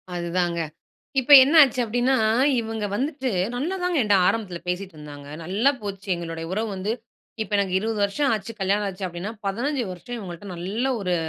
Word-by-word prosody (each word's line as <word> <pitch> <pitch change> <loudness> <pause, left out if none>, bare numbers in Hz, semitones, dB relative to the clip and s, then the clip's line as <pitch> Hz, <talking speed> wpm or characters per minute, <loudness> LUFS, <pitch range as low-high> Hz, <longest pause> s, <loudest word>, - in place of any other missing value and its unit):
அதுதாங்க, 170 0 -1 0.6
இப்ப 290 +3 +2
என்ன 290 +5 0
ஆச்சு 255 -2 +2
அப்படின்னா 245 +4 +1 0.5
இவங்க 220 -1 -4
வந்துட்டு 270 +1 -1 0.3
நல்லா 325 +9 -2
தாங்க 360 -3 +1
என்ட்ட 205 -2 +4
ஆரம்பத்துல 190 -6 -2
பேசிட்டு 185 0 -3
இருந்தாங்க. 145 -1 -10 0.2
நல்லா 205 +11 +2
போச்சு 195 -1 -6
எங்களுடைய 165 -1 -5
உறவு 220 +1 -1
வந்து 200 +4 -2 0.5
இப்போ 210 - -9
எனக்கு 190 -2 0
20 220 +1 -2
வருஷம் 275 +8 0
ஆச்சு 215 +2 -5
கல்யாணம் 200 +2 +1
ஆச்சு 190 0 -6
அப்படின்னா, 175 +4 -5 0.2
15 250 +7 -1
வருஷம் 240 +7 -7
இவங்கள்ட்ட 185 -1 -8
நல்ல 200 +9 -2
ஒரு 180 -2 0
205 Hz, 165 wpm, -24 LUFS, 180-245 Hz, 0.6 s, என்ட்ட